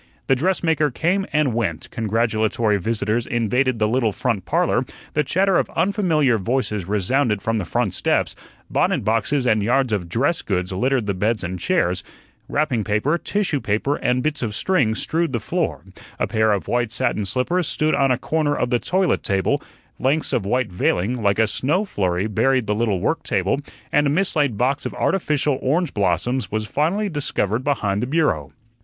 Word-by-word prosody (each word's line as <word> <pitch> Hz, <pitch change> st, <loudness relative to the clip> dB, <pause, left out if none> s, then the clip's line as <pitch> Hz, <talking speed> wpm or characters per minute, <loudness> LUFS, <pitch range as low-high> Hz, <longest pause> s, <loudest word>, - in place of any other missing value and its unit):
The 135 Hz, -, +3 dB
dressmaker 160 Hz, -1 st, +1 dB
came 180 Hz, +9 st, 0 dB
and 150 Hz, -5 st, +2 dB
went, 120 Hz, +1 st, -2 dB
congratulatory 110 Hz, 0 st, +1 dB
visitors 115 Hz, +3 st, -1 dB
invaded 125 Hz, +2 st, +1 dB
the 110 Hz, -1 st, +2 dB
little 115 Hz, -1 st, +1 dB
front 110 Hz, -2 st, -2 dB
parlor, -, -, +1 dB, 0.3 s
the 150 Hz, -, +2 dB
chatter 190 Hz, +6 st, +2 dB
of -, -, -1 dB
unfamiliar 165 Hz, -, +2 dB
voices 105 Hz, -3 st, -1 dB
resounded 105 Hz, +3 st, +1 dB
from 115 Hz, +2 st, -1 dB
the 95 Hz, -, -3 dB
front 85 Hz, -, -1 dB
steps; -, -, 0 dB, 0.3 s
bonnet -, -, 0 dB
boxes 120 Hz, +5 st, +1 dB
and 110 Hz, -3 st, +3 dB
yards 125 Hz, +2 st, +1 dB
of 90 Hz, -5 st, -2 dB
dress 140 Hz, -, +1 dB
goods 90 Hz, -1 st, -2 dB
littered 125 Hz, +4 st, +1 dB
the 100 Hz, -, -1 dB
beds 105 Hz, +4 st, 0 dB
and 90 Hz, +1 st, -4 dB
chairs; 95 Hz, -, 0 dB, 0.5 s
wrapping 140 Hz, -7 st, 0 dB
paper, 110 Hz, -, 0 dB
tissue 195 Hz, -8 st, -1 dB
paper, 110 Hz, +8 st, 0 dB
and 125 Hz, 0 st, 0 dB
bits 155 Hz, -1 st, -1 dB
of 110 Hz, -4 st, -2 dB
string 130 Hz, -, +1 dB
strewed 165 Hz, +3 st, -1 dB
the 115 Hz, -, 0 dB
floor; -, -, -2 dB, 0.3 s
a -, -, 0 dB
pair 110 Hz, 0 st, +2 dB
of 100 Hz, -2 st, -1 dB
white 120 Hz, -2 st, 0 dB
satin 120 Hz, -3 st, 0 dB
slippers 130 Hz, -, 0 dB
stood 155 Hz, 0 st, 0 dB
on 135 Hz, -1 st, +3 dB
a 125 Hz, -, +2 dB
corner 155 Hz, 0 st, 0 dB
of 125 Hz, -, -1 dB
the 120 Hz, -, +3 dB
toilet 185 Hz, +3 st, +1 dB
table; 95 Hz, -1 st, 0 dB, 0.4 s
lengths 140 Hz, +4 st, +1 dB
of 100 Hz, -5 st, 0 dB
white 125 Hz, 0 st, 0 dB
veiling, 100 Hz, +6 st, 0 dB
like 100 Hz, -1 st, +2 dB
a 110 Hz, -, +4 dB
snow 150 Hz, -, 0 dB
flurry, 95 Hz, -, -1 dB
buried 125 Hz, +3 st, +1 dB
the 105 Hz, -, 0 dB
little 105 Hz, -3 st, 0 dB
work 160 Hz, -, 0 dB
table; 95 Hz, +7 st, 0 dB, 0.3 s
and 150 Hz, 0 st, +3 dB
a -, -, +2 dB
mislaid 150 Hz, -, +1 dB
box 130 Hz, +5 st, 0 dB
of -, -, -5 dB
artificial 150 Hz, -6 st, 0 dB
orange 155 Hz, +3 st, 0 dB
blossoms 105 Hz, +6 st, 0 dB
was 110 Hz, 0 st, -1 dB
finally 170 Hz, -, 0 dB
discovered 130 Hz, -, -1 dB
behind 105 Hz, -8 st, 0 dB
the 125 Hz, -, -1 dB
bureau. 130 Hz, -, 0 dB
125 Hz, 180 wpm, -21 LUFS, 105-150 Hz, 0.5 s, a